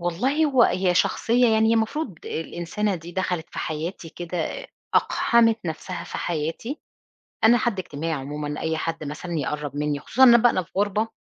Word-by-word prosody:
والله 245 - +1
هو 265 -5 +4
هي 180 -3 +2
شخصية 240 +6 +3
يعني، 220 0 +3
هي 230 - +4
المفروض 225 - -1
الإنسانة 175 +5 -2
دي 170 0 -8
دخَلِت 180 -3 -2
في - - -8
حياتي 165 +2 -4
كده، 175 - -4 0.3
أقحَمِت 230 -1 +3
نفسها 170 +2 -5
في - - -6
حياتي. 170 - -3 0.6
أنا 230 +2 +7
حد 225 -4 -1
اجتماعي 165 -2 -4
عمومًا، 145 +1 -4
أي 160 0 -1
حد 165 -1 -3
مثلًا 150 +4 -6
يقرَب 145 0 -3
مِنِّي، 145 0 -1
خصوصًا 260 - +2
أنا 240 -2 +9
بقى 230 -5 +3
في - - -30
غُربة، 205 +2 +1
180 Hz, 165 wpm, -24 LUFS, 160-225 Hz, 0.6 s, أنا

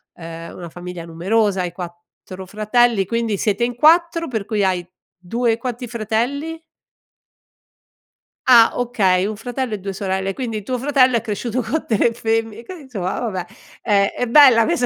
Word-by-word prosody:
ehm, 165 0 -9
una 175 -2 -8
famiglia 175 0 -8
numerosa, 190 +4 0
hai 175 -1 -4
4 175 +1 -10
fratelli, 215 +1 +2
quindi 230 0 -1
siete 210 +3 0
in 245 0 -4
4 335 +4 +3
per 220 -5 -3
cui 210 -2 -1
hai 180 -2 0 0.3
2 225 +6 -1
quanti 245 +1 -5
fratelli? 245 +9 -2 1.9
Ah, 235 -3 +7
okay, 195 -7 +1
1 210 0 -4
fratello 245 0 -4
e - - -1
2 195 0 -6
sorelle, 190 0 -2
quindi 225 -3 -4
tuo 250 +5 -2
fratello 260 -1 +3
è 230 - +1
cresciuto 230 +3 -3
co 265 +8 -3
3 230 +1 +2
femmi 225 0 -2
qui 365 -3 -9
insomma 200 -9 -4
vabbè 190 -7 -3 0.4
è 200 -1 +2
è 245 - -1
bella 240 -3 +7
questa 250 -5 +1
225 Hz, 160 wpm, -20 LUFS, 190-245 Hz, 1.9 s, Ah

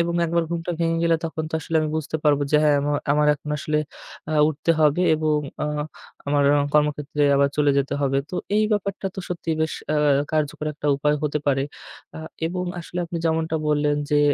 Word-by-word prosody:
এবং 170 0 0
একবার 170 0 +1
ঘুমটা 170 0 -3
ভেঙে 165 0 +1
গেলে 165 -1 +3
তখন 160 -1 -3
তো - - -4
আসলে 160 +1 -2
আমি 155 - -1
বুঝতে 155 0 -2
পারবো 145 -1 +3
যে 150 - +5
হ্যাঁ 150 -1 +4
আম 145 - -3 0.3
আমার 150 0 +3
এখন 150 +1 -9
আসলে 150 +2 -1 0.5
আ - - -1 0.2
উঠতে 155 +2 -1
হবে 155 +3 +3
এবং 155 -1 +1 0.2
আ - - +1 0.6
আমার 145 0 +2 0.3
কর্মক্ষেত্রে 150 0 +1
আবার 140 0 +4
চলে 145 -1 +3
যেতে 140 +1 -1
হবে। 135 0 +1
তো - - -6 0.2
এই 215 - +4
ব্যাপারটা 200 -1 -2
তো 190 - -5
সত্যিই 165 -2 -3
বেশ 160 - 0 0.2
আ - - +2 0.4
কার্যকর 155 0 -1
একটা 150 - -5
উপায় 150 +1 +1
হতে 150 0 0
পারে। 135 -1 +2 0.5
আ - - -6 0.3
এবং 180 +2 -3 0.2
আসলে 175 +1 -7
আপনি 170 0 -5
যেমনটা 160 0 0
বললেন, 145 0 +2
যে 150 - +4
155 Hz, 195 wpm, -23 LUFS, 145-165 Hz, 0.6 s, যে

